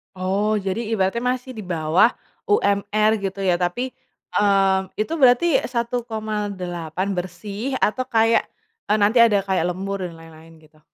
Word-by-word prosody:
Oh, 195 +4 0
jadi 195 +1 -2 0.2
ibaratnya 195 +3 0
masih 250 +1 -2
di 225 - -9
bawah 170 0 +2 0.4
UMR, 210 - +2
gitu, 195 0 -4
ya, 180 -2 +2
tapi, 245 +9 -1 0.4
eee, 195 -2 +3 0.2
itu 215 +9 -2
berarti 265 +5 +5
Rp1.800.000 210 -7 -3
bersih, 200 +7 -4
atau 255 +4 0
kayak 225 0 +2 0.4
a 210 - +3
nanti 210 +4 +3
ada 210 -4 +5
kayak 190 -3 0
lembur 195 +1 -4
dan 170 - -11
lain-lain, 165 0 -15
gitu? 155 0 -23
200 Hz, 135 wpm, -22 LUFS, 185-230 Hz, 0.4 s, berarti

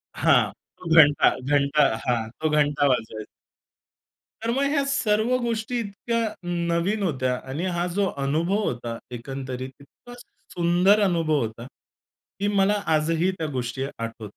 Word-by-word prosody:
हां. - - +3 0.3
तो 165 - -8
घंटा, 145 -3 +7 0.2
घंटा, 145 +1 +3 0.2
हां. 115 -3 0
तो 155 - +1
घंटा. 145 -1 +2 1.6
तर 230 - -1
मग 270 +3 0
ह्या 280 -2 +2
सर्व 240 -3 +1
गोष्टी 235 +1 -2
इतक्या 230 +2 -3 0.2
नवीन 175 +4 -1
होत्या 130 -7 0
आणि 160 +7 -3
हा 175 - 0
जो 200 -1 +2 0.2
अनुभव 170 +9 0
होता 120 -4 -3 0.2
एकंदरीत 130 0 -6
इतका 245 - -16 0.4
सुंदर 180 +4 +3
अनुभव 165 -5 +1
होता, 115 +1 -5 0.7
की 205 - 0
मला 205 0 +2
आजही 165 +4 +1
त्या 160 - -2
गोष्टी 125 +2 -3
आठवतात. 115 -2 -6
165 Hz, 130 wpm, -24 LUFS, 135-205 Hz, 1.6 s, घंटा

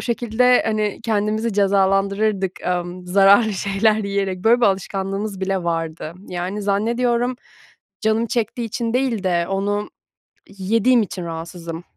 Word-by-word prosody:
şekilde, 240 +1 +2
hani, 215 -2 -1
kendimizi 215 +1 0
cezalandırırdık, 195 0 +1
amm, 180 0 -3
zararlı 200 +4 +5
şeyler 200 +3 +1
yiyerek. 200 -3 -2
Böyle 235 +2 +5
bir 235 - +5
alışkanlığımız 195 +1 -2
bile 190 -2 -1
vardı. 165 -1 -3
Yani, 180 +3 -4
zannediyorum 235 +4 0 0.6
canım 220 +1 +1
çektiği 235 +1 -2
için 230 0 -3
değil 250 -5 0
de 175 -2 +1
onu 205 +2 -2 0.7
yediğim 230 +5 +3
için 180 -2 -6
rahatsızım. 165 0 -7
200 Hz, 120 wpm, -21 LUFS, 190-225 Hz, 0.7 s, zararlı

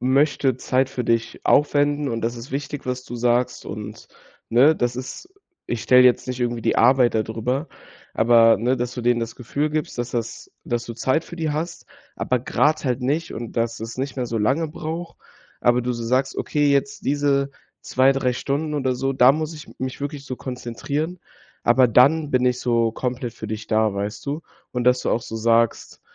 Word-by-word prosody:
möchte 135 0 +2
Zeit 130 0 +1
für 125 -2 -4
dich 115 0 -1
aufwenden 145 0 +2
und 115 -2 -3
das 115 +1 -1
ist 120 +2 -9
wichtig, 140 +1 -5
was 125 0 -3
du 120 - -8
sagst 120 +1 0
und - - -8 0.4
ne? 135 +7 +5
Das 120 -2 -1
ist 130 - -7 0.4
ich 120 -2 -3
stelle 125 +1 +6
jetzt 125 -1 +4
nicht 125 0 -4
irgendwie 120 -2 -1
die - - +1
Arbeit 125 0 +4
da 110 - +2
drüber.“ 125 +7 -3 0.5
Aber, 115 0 +5
ne? 120 +5 +1
Dass 125 0 -3
du 125 - -5
denen 120 0 +2
das 115 0 -5
Gefühl 140 +5 -2
gibst, 150 -4 -3
dass 120 0 -3
das 115 -1 -4
dass 120 0 -2
du 115 - -6
Zeit 130 +7 0
für 170 - -10
die 160 -2 -1
hast, 165 +3 -4 0.3
aber 125 - 0
grade 150 +6 +1
halt 125 -1 -1
nicht 155 +6 -1
und 115 -1 -6
dass 115 -1 -1
es 115 +2 -7
nicht 135 +1 -3
mehr 125 - -1
so 115 -1 -3
lange 135 +10 +1
braucht. 165 +2 -6 0.4
Aber 120 0 +3
du 125 +1 -1
so 120 -1 -5
sagst: 130 +3 0
„Okay, 145 -1 +1
jetzt 205 +9 -1
diese 140 -1 +1 0.3
2, 130 +1 +3
3 130 -2 0
Stunden 145 +5 -2
oder 130 -3 0
so, 135 +2 -1
da 125 0 +6
muss 155 +3 -2
ich 150 - -11
mich 130 +1 -4
wirklich 145 0 -5
so 130 -1 -5
konzentrieren, 140 +8 -4 0.4
aber 125 +2 +5
dann 140 +6 +4
bin 130 -2 +2
ich 125 0 +2
so 115 -2 +2
komplett 125 0 -3
für - - -7
dich 110 0 -5
da, 110 -1 +2
weißt 100 +2 -4
du?“ 145 +3 -3 0.3
Und 125 -1 -2
dass 125 0 +3
du - - -1
auch 115 - 0
so 115 - -6
sagst, 115 +1 +1
125 Hz, 205 wpm, -22 LUFS, 120-145 Hz, 0.5 s, stelle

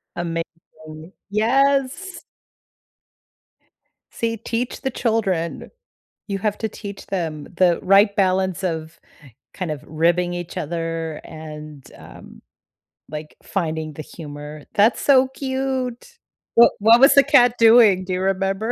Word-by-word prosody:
Amazing. 165 -1 -7 0.2
Yes! 275 - 0 1.9
See, 230 -1 -2
teach 230 +3 -4
the 265 - -1
children. 195 -9 -2 0.6
You 195 -1 -2
have 210 +1 -2
to 220 - -2
teach 200 -2 -9
them 160 -6 -4
the 180 -1 +1
right 200 +2 +4
balance 190 -1 +1
of 160 -2 -4 0.6
kind 180 -4 -4
of 150 -1 -6
ribbing 175 +3 +1
each 175 -1 -6
other 165 0 -4
and, 155 -2 -10
um, - - -14 0.7
like, 150 +1 -8
finding 160 -5 -3
the 155 - -8
humor. 150 -1 -10
That's 215 +3 +3
so 265 -2 +5
cute. 265 - -4 0.4
Wha 235 - +8
what 225 +3 +6
was 270 +3 +6
the 280 - +7
cat 245 -4 +4
doing? 225 -5 +6
Do 185 - -3
you 180 - -2
remember? 195 +3 -1
190 Hz, 120 wpm, -21 LUFS, 165-230 Hz, 1.9 s, Wha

